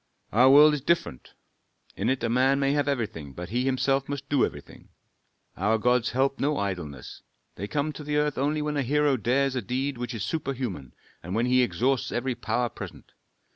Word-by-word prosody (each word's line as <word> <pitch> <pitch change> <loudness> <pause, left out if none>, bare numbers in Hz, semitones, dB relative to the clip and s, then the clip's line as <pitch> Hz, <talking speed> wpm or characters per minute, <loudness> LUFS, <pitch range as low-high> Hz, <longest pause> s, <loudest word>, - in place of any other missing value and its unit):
"Our 125 +5 +5
world 150 +2 +8
is 150 - -2
different: 170 - -1 0.6
in - - -1
it 130 -2 -1
a - - +2
man 130 +4 +3
may 135 0 +2
have 145 -1 +1
everything, 105 - -3
but 90 +3 -7
he 125 +4 -1
himself 135 +1 +1
must 140 -1 -5
do 140 -3 +3
everything. - - -6 0.7
Our 105 +5 +1
gods 125 +2 +2
help 135 +2 0
no 145 +1 0
idleness. 85 -10 -5 0.3
They 100 - -6
come 150 +5 -1
to 150 - -8
the 150 0 -1
earth 150 -1 +1
only 150 +2 0
when 150 0 -2
a - - +2
hero 145 +2 +2
dares 130 +3 +1
a 125 - -1
deed 130 +4 -3
which 120 0 -4
is 105 - -4
superhuman 125 - -4 0.3
and 90 +3 -5
when 115 +2 +1
he 125 0 +4
exhausts 125 +2 0
every 125 +1 -1
power 120 0 -1
present. - - -10
130 Hz, 195 wpm, -26 LUFS, 115-140 Hz, 0.7 s, world